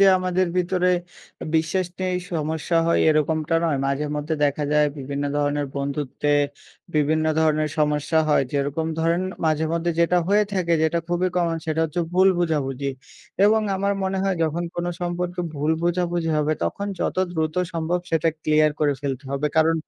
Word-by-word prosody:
যে 195 - +7
আমাদের 185 0 +1
ভিতরে 180 0 +2 0.6
বিশ্বাস 160 +4 +1
নেই, 185 -1 0 0.2
সমস্যা 160 +1 -1
হয় 170 - +3
এরকমটা 155 +1 +1
নয়। 150 -4 +1
মাঝেমধ্যে 150 +2 -2
দেখা 145 +1 0
যায় 150 0 +4
বিভিন্ন 140 +1 -3
ধরনের 145 0 0
বন্ধুত্বে 140 +1 -1 0.6
বিভিন্ন 155 +1 +2 0.2
ধরনের 155 -1 +2
সমস্যা 150 +1 +1
হয়। 145 -2 +3
যেরকম 145 +3 -1
ধরেন 165 +2 +1 0.2
মাঝেমধ্যে 160 +2 +1
যেটা 175 +1 +3
হয়ে 210 +1 +4
থাকে, 180 -3 0
যেটা 160 +2 +2
খুবই 175 +1 +1
common 170 -2 +1
সেটা 160 0 0
হচ্ছে 160 +2 -2
ভুল 185 +1 +6
বোঝাবুঝি। 140 -5 -1 0.5
এবং 220 +1 +5 0.2
আমার 200 +1 0
মনে 190 0 -1
হয় 195 -1 0
যখন 165 +2 -2
কোনো 175 0 -1
সম্পর্কে 175 +1 -2
ভুল 150 +2 0
বোঝাবুঝি 175 -1 0
হবে 150 +1 +1
তখন 200 - -3
যত - - -1 0.2
দ্রুত 155 -2 -1 0.2
সম্ভব 165 +2 -1
সেটা 165 0 +2
clear 155 0 +3
করে 145 -2 +2
ফেলতে 140 -1 -4
হবে। 140 +2 -1
কারণ 160 +1 +4
160 Hz, 155 wpm, -23 LUFS, 150-175 Hz, 0.6 s, যে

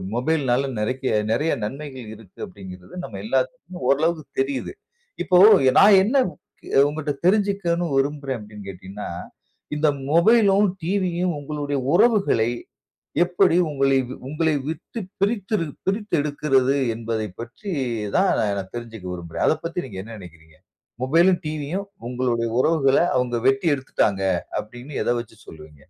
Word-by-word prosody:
மொபைல்னால 135 -1 +1
நிறைய 120 -1 0
நிறைய 150 +8 +1
நன்மைகள் 135 -1 -7
இருக்கு 105 -4 -18
அப்பிடிங்கிறது 90 -1 -12
நம்ம 100 -3 -7
எல்லாத்துக்குமே 135 - -2
ஓரளவுக்கு 155 +2 +1 0.2
தெரியுது. 135 -1 -3 0.5
இப்போ 180 -1 +4 0.4
நான் 200 -1 +8
என்னஅ 260 +5 +3 0.7
உங்கட்ட 150 -1 -3 0.2
தெரிஞ்சிக்கணு 195 -4 +1
விரும்புறேன் 140 -2 -1
அப்பிடின்னு 105 -1 -11
கேட்டீங்கன்னா, 95 +2 -8 0.7
இந்த 150 +1 +2 0.3
மொபைலும், 200 +2 +5 0.2
டிவியும் 180 -2 0
உங்களுடைய 145 -1 -3
உறவுகளை 195 - +3 0.7
எப்பிடி 180 0 +2
உங்களை 135 -2 +2 0.3
உங்களை 155 +2 0
விட்டு 165 +8 -5 0.2
பிரித்து 205 +1 -1
இரு 165 - -1 0.2
பிரித்து 205 +1 -2
எடுக்கிறது 140 -2 +1 0.2
என்பதை 110 -1 -3
பற்றி 120 - -8 0.5
தான் - - +4
நான் 100 -2 -2
தெரிஞ்சிக்க 115 -5 -8
விரும்புறேன். 85 -2 -5
அத - - +4
பத்தி 175 +1 -3
நீங்க 100 -7 -9
என்ன 115 +1 -9
நினைக்கிறீங்க? 80 -4 -14 0.5
மொபைலும், 170 +7 +4
டிவியும் 155 +6 -3 0.2
உங்களுடைய 120 -2 -1
உறவுகள 140 -4 +3 0.2
அவுங்க 125 -1 0
வெட்டி 135 +5 +2
எடுத்துட்டாங்க 105 -7 0 0.4
அப்பிடின்னு 120 +6 -6
எத - - 0
வச்சு 110 -1 -15
சொல்லுவீங்க. 75 -1 -12
140 Hz, 125 wpm, -23 LUFS, 115-170 Hz, 0.7 s, நான்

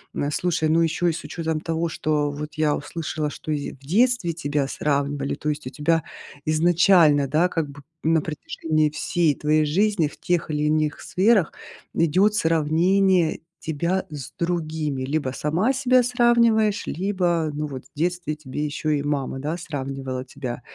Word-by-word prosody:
М, 145 +1 -1
слушай, 160 -1 0
ну 165 +2 +3
ещё 165 +2 +1
и 170 - +2
с - - -6
учётом 160 -2 -3
того, 165 0 -1
что 150 -2 0
вот 150 +1 -7
я 155 -1 +2
услышала, 155 0 -3
что 155 - -6
ись 145 -1 -1
и - - -5
в 135 - -18
детстве 195 - +2
тебя 145 -3 -1
сравнивали. 140 -1 -1
То 150 - -3
есть 145 -3 -3
у - - -3
тебя 150 +4 +1 0.4
изначально, 160 -2 +4
да, 155 +6 +3
как 160 -4 -2
бы 140 0 -11 0.2
на 160 0 +3
протяжении 155 0 -1
всей 155 0 0
твоей 155 +1 +2
жизни 190 +1 +2
в - - -12
тех 175 -2 0
или 150 0 -1
иных 155 0 +1
сферах 195 -2 +2 0.4
идёт 185 +6 +3
сравнение 170 +1 +2 0.2
тебя 170 +5 -1
с 145 -4 -7
другими. 155 -5 -2
Либо 140 -1 -1
сама 175 - +1
себя 255 -1 +4
сравниваешь, 235 -3 +3
либо, 175 -4 0
ну 150 +1 -3
вот, 130 -2 -7
в - - -25
детстве 175 -2 -1
тебе 150 -1 -5
ещё 155 +1 -2
и 145 -2 0
мама, 140 -2 -2
да, 155 +5 -3
сравнивала 135 -4 -5
тебя. 125 -2 -6
155 Hz, 170 wpm, -23 LUFS, 145-175 Hz, 0.4 s, изначально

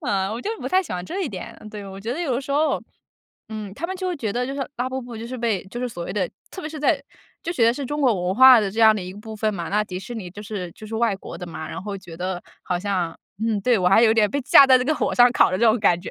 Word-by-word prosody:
嗯， 195 -1 0
我 230 - -4
就 415 - -3
不 - - -5
太 375 +1 +3
喜 340 - -8
欢 180 -1 -4
这 380 - -4
一 320 - -2
点， 185 -6 -8
对， 205 -1 -8
我 195 0 -9
觉 225 +4 -3
得 290 - -5
有 290 -8 0
的 245 - -1
时 275 - -9
候， 300 +3 +1 0.7
嗯， 215 -3 -6
他 335 +8 -4
们 375 - -5
就 370 0 -3
会 355 - -2
觉 220 -7 -3
得 245 +3 -1
就 265 - -4
是 275 - -3
拉 245 +1 -1
布 260 0 -4
布 240 -2 -9
就 225 - -6
是 255 +2 -6
被 225 -5 -1
就 220 +5 -7
是 250 - -1
所 175 -7 -6
谓 180 - -5
的 190 -4 -1 0.2
特 380 - -8
别 310 - -5
是 310 -1 -8
在 300 -1 +2 0.4
就 340 - -2
觉 245 -10 +2
得 230 - +5
是 275 0 -5
中 295 +2 -3
国 220 -10 +2
文 185 - 0
化 260 +2 +9
的 210 -3 0
这 215 +4 -3
样 220 -1 +7
的 - - -3
一 185 0 -7
个 205 - -11
部 220 0 -8
分 215 0 0
嘛， 170 -3 -4
那 210 +2 +1
迪 185 -2 -6
士 240 +4 -7
尼 195 -5 -6
就 205 +4 -10
是 200 -4 -5
就 - - -13
是 220 +1 -5
外 225 -2 +2
国 - - -9
的 180 - -7
嘛， 160 -2 -7
然 - - -6
后 200 0 -5
觉 175 -3 -11
得 180 +1 -3 0.2
好 180 - -2
像 180 -3 -2 0.3
嗯， 225 -2 +1
对， 245 -3 +3
我 180 -1 +3
还 195 +5 +5
有 225 -1 +6
点 210 -2 +3
被 285 - -1
架 275 +2 +8
在 260 -1 +7
这 250 - -1
个 310 +4 +1
火 - - -1
上 245 0 +6
烤 235 - +4
的 185 - 0
这 235 - +3
种 225 +1 +4
感 175 -4 +4
觉。 185 - -7
220 Hz, 360 characters per minute, -23 LUFS, 195-255 Hz, 0.7 s, 化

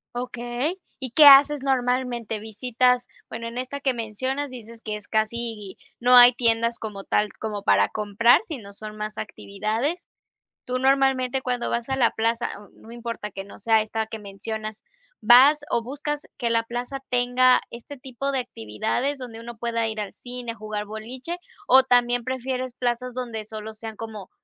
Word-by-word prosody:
Okey, 245 +8 -3 0.2
¿y 260 -3 -3
qué 300 +4 +7
haces 285 +1 +8
normalmente? 250 -4 -1
Visitas, 245 +3 +1 0.2
bueno, 230 +1 -6
en 235 +2 -5
esta 260 +2 -4
que 270 -2 +1
mencionas 260 +5 -3
dices 230 -2 -11
que 215 -1 -3
es 210 - -12
casi 220 -2 -2 0.2
no 250 +1 +5
hay 245 0 +10
tiendas 230 -1 +1
como 205 -3 -6
tal, 210 0 +1
como 210 -2 -4
para - - +3
comprar, 215 +3 +3
sino 240 - -8
son 215 +1 -8
más 215 0 -5
actividades. 220 - -3 0.5
Tú 250 0 -2
normalmente 265 -1 +2
cuando 250 -2 -2
vas 235 +2 -2
a 265 - 0
la 240 -3 +3
plaza, 230 +1 -1
n 205 0 -13 0.2
no - - -11
importa 230 -3 -6
que 195 - -6
no 200 - -14
sea 220 +1 +3
esta 220 +1 -3
que 220 - -6
mencionas, 215 +1 -6 0.4
¿vas 255 +7 +6
o 235 - 0
buscas 290 +3 -4 0.2
que 235 -3 -1
la 230 0 +2
plaza 245 +4 -5
tenga 250 +1 +4
este 240 +5 -10
tipo 265 +2 -4
de 265 - +1
actividades?, 240 - -2
donde 230 -3 -8
uno 235 0 -9
pueda 230 -1 -1
ir 220 0 -5
al 205 - -4
cine, 245 -1 -6
jugar 215 -1 -5
boliche, 240 +9 -6 0.3
¿o 260 +1 +7
también 245 -1 +3
prefieres 255 0 -3
plazas 250 0 -2
donde 235 -3 -4
solo 215 0 -8
sean 220 0 -8
como 215 -4 -8
235 Hz, 170 wpm, -24 LUFS, 220-255 Hz, 0.5 s, hay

